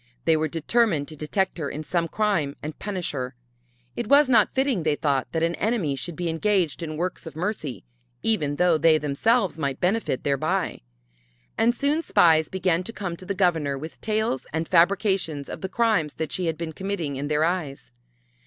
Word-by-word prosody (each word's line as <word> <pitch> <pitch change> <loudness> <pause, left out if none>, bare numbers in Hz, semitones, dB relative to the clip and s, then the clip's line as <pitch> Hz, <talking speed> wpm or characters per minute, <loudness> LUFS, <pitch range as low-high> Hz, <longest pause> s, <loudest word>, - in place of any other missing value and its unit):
They 165 - +4
were 155 0 +1
determined 165 0 +1
to 155 - -9
detect 175 +5 -1
her 145 -3 -2
in 155 - -5
some 170 +1 0
crime 170 -9 0
and 155 0 -6
punish 190 -4 -3
her. 130 -2 -4 0.6
It 240 - -3
was 280 +3 +6
not 225 -5 +4
fitting, 265 -7 +1
they 155 -2 +1
thought, 140 -3 0
that 165 -1 -1
an 170 +1 +1
enemy 190 -8 0
should 135 +6 -5
be 175 +1 -3
engaged 175 -1 0
in 155 -2 -4
works 180 0 -3
of 160 - -9
mercy, 165 - -3 0.4
even 155 -11 +1
though 175 -1 +3
they 160 0 +5
themselves 170 - +1
might 140 -3 -2
benefit 185 - 0
thereby. 140 -2 0 0.7
And 235 +1 +2
soon 290 +5 +1
spies 160 - +4
began 180 -2 +1
to - - -5
come 190 -6 -4
to 185 - -12
the 200 - -2
Governor 160 -7 +1
with 155 +4 -9
tales 215 - -1
and 160 +1 -2
fabrications 180 -4 +2
of - - -7
the 190 - -3
crimes 210 -8 +1
that 160 -2 -4
she 180 -2 -2
had 160 -1 -1
been 165 -1 -5
committing 185 -6 -3
in 140 +2 -3
their 150 +1 +2
eyes. 160 -8 -3
165 Hz, 190 wpm, -25 LUFS, 150-200 Hz, 0.7 s, was